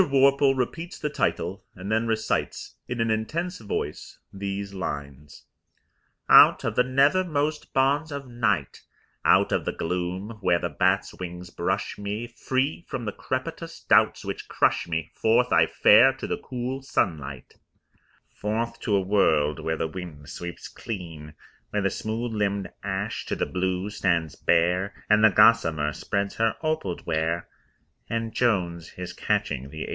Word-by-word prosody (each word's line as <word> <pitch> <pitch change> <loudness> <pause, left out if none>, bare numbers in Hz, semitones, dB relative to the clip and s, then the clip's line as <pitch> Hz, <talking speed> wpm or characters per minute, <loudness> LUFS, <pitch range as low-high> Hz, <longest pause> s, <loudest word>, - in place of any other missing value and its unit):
Worple 140 0 +4
repeats 165 +8 -3
the 150 - -3
title, 95 - -1
and 95 +3 -6
then 110 +1 +1
recites 110 -1 -2
in 125 -1 -4
an 115 -1 +1
intense 165 - -2
voice 105 - -5 0.2
these 100 0 -4
lines: 75 -5 -6 0.8
Out - - +8
of - - -2
the - - +5
nethermost 150 +3 +1
bonds 140 +4 +2
of 140 -2 -5
night, 110 - -1 0.4
Out - - +4
of - - +1
the - - -1
gloom 90 +5 -3
where 90 -2 +3
the 85 0 -3
bats' 95 +6 +1
wings 90 0 -7
brush 95 +4 -2
me, 105 +3 -3
Free 130 +6 -2
from 120 - -4
the 105 - -2
crepitous - - -5
doubts - - +4
which - - -5
crush - - +1
me, 80 -1 -3
Forth 120 +3 +2
I - - +5
fare 120 +6 +6
to 135 - -7
the - - -2
cool 130 +1 -4
sunlight; 75 - -2 0.8
Forth 115 +3 -3
to 105 - 0
a 100 - +3
world 80 -7 +2
where 80 0 -2
the 80 - -1
wind 80 -4 -8
sweeps 85 0 -7
clean, 80 -7 -7 0.3
Where 105 -1 -1
the 100 - +1
smooth 115 +2 -3
limbed 100 -2 -1
ash 100 +2 -3
to - - -1
the - - -1
blue 95 +2 -2
stands 85 -7 0
bare, 90 +3 +1 0.2
And 105 0 +5
the 110 - +9
gossamer 85 -8 +4
spreads 100 +4 -2
her 115 -1 +2
opalled 155 - -2
ware 80 +1 -1 0.6
And 115 -1 -2
Jones 90 -8 0
is 90 -1 -6
catching 65 +2 -1
the 80 +2 -6
8. - - -7
100 Hz, 155 wpm, -26 LUFS, 85-120 Hz, 0.8 s, the